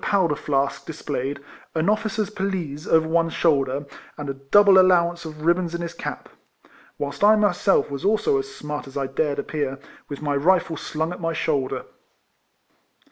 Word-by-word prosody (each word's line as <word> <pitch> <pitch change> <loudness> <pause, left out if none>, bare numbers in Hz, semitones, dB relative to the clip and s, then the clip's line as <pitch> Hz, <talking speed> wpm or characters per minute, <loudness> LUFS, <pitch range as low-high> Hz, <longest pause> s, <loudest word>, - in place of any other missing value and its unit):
245 200 - +1
powder - - -7
flask 140 -1 0
displayed, 145 -3 -4 0.4
an 160 +2 +1
officer's 215 0 0
pelisse 185 -8 -3
over 160 0 +3
one 165 0 +2
shoulder, 140 -4 +1 0.3
and 145 -2 -4
a - - -5
double 190 +9 +5
allowance 175 -2 +3
of 155 -1 -8
ribbons 170 0 +1
in 170 - -4
his 170 -1 -5
cap; - - -6 0.7
whilst 145 +6 -4
I 215 +1 +7
myself 200 -7 +2
was 140 +2 -5
also 205 -8 +2
as 135 0 -5
smart 150 +1 -6
as 135 - -8
I 140 - 0
dared 140 +2 -1
appear, 145 -3 -3 0.3
with 145 - -6
my 145 -1 0
rifle 165 +2 +2
slung 160 +2 -3
at 180 - -10
my 165 0 -1
shoulder. 140 -5 -1
160 Hz, 170 wpm, -23 LUFS, 140-180 Hz, 0.7 s, I